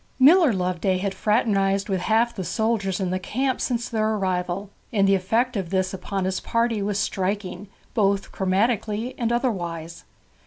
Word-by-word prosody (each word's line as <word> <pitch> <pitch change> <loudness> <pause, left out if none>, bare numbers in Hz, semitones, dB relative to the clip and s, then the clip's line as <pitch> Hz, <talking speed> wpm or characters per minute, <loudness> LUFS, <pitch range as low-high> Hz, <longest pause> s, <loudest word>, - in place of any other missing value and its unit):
Miller 305 +3 +6
Loveday 185 -1 0
had 195 +1 -2
fraternized 200 -3 +1
with 190 -3 0
half 225 +4 +2
the 190 - -3
soldiers 215 -2 0
in 185 -2 -1
the 185 - -1
camp 260 +7 -1
since 240 -2 -1
their 220 -1 0
arrival, 185 0 -2 0.2
and 200 -4 +3
the 195 - +4
effect 225 +7 +1
of 190 -5 -2
this 185 0 0
upon 190 0 -3
his 190 0 -1
party 230 -2 0
was 200 0 -1
striking 200 -1 -2 0.3
both 200 -3 +1
chromatically 210 +4 0
and 235 -1 0
otherwise. 170 -9 -2
200 Hz, 160 wpm, -24 LUFS, 185-230 Hz, 0.3 s, Miller